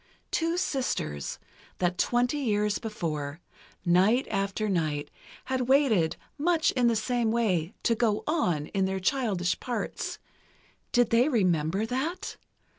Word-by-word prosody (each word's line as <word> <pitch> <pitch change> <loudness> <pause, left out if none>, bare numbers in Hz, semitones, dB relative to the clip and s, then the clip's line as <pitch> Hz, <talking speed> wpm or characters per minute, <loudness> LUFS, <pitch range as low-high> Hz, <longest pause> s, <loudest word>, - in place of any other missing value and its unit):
Two 330 +1 0
sisters, 75 - -2 0.4
that 180 0 0
twenty 245 +4 +2
years 210 -5 +1
before, 155 -9 -4 0.5
night 190 +9 +4
after 195 +1 -1
night, 155 -6 -1 0.3
had 260 -1 -1
waited 240 - +4 0.2
much 325 +1 +3
in 250 -2 +2
the 230 - +3
same 235 +1 0
way 200 -6 0
to 235 - +3
"go 220 -2 +1
on" 180 - +1
in 195 -1 +1
their 190 0 -1
childish 190 -5 0
parts. 245 -2 -3 0.7
Did 245 -2 +3
they 240 +5 +4
remember 185 - +1
that? 270 +10 -3
220 Hz, 125 wpm, -28 LUFS, 180-250 Hz, 0.7 s, night